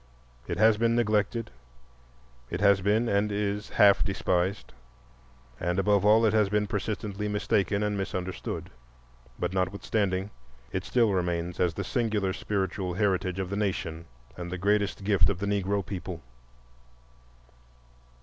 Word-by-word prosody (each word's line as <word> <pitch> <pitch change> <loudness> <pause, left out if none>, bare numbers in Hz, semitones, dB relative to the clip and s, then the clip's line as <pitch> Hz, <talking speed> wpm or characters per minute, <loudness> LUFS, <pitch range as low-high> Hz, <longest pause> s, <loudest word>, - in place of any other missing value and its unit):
It 85 - -3
has 110 +1 +5
been 115 +1 +2
neglected, 110 0 0 1.0
it 85 - -3
has 100 -1 +4
been, 105 +5 +2
and 105 0 +1
is, 105 0 -2
half 100 -1 +5
despised, 95 0 -1 0.9
and 90 +1 -1
above 100 0 +3
all 110 +2 +5
it 110 - +3
has 105 -2 +3
been 105 0 +1
persistently 105 0 -3
mistaken 105 -1 0
and 105 0 0
misunderstood; 95 -2 -4 0.7
but 90 +1 -2
notwithstanding, 95 +1 -1 0.4
it - - -3
still 115 -5 +2
remains 90 -1 -1
as 85 -2 +1
the - - -3
singular 105 -5 0
spiritual 95 -2 -2
heritage 95 -2 0
of 95 -1 -3
the - - -1
nation 95 -5 -2 0.3
and 90 -1 -6
the 90 - -3
greatest 100 +1 0
gift 95 -2 +3
of 100 - -1
the 100 - -3
Negro 100 -1 0
people. 90 -2 -6
100 Hz, 140 wpm, -28 LUFS, 95-105 Hz, 1.0 s, has